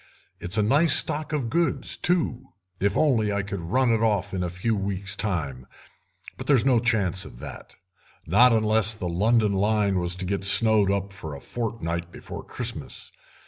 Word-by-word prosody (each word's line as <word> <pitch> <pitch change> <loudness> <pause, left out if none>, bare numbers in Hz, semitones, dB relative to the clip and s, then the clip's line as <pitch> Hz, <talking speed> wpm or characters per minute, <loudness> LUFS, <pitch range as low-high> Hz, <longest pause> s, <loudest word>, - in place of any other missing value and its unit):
It's 90 +4 -3
a 105 - +3
nice 145 +7 +4
stock 155 +1 +1
of 145 -6 -2
goods, 170 +1 0
too, 175 -8 -1 0.3
if 100 0 +1
I 110 -7 +1
could 100 -1 -5
only 85 - -8
run 130 +4 +2
it 115 -1 +1
off 100 -3 0
in 95 - -2
a 90 - -2
few 95 +6 -2
weeks 100 -1 -3
time, 70 - -3 0.7
but - - -8
there's 135 -5 +3
no 130 -3 +4
chance 105 -6 0
of - - -12
that—not 95 - -1
unless 110 -1 +3
the 95 -4 -5
London 105 +4 +1
line 100 -1 +1
was 90 0 -2
to 95 0 -5
get 100 +1 -2
snowed 105 0 +5
up 100 0 -2
for 80 -6 -7
a - - -9
fortnight 85 -8 -4
before - - -9
Christmas. - - -5
105 Hz, 175 wpm, -25 LUFS, 95-115 Hz, 0.7 s, snowed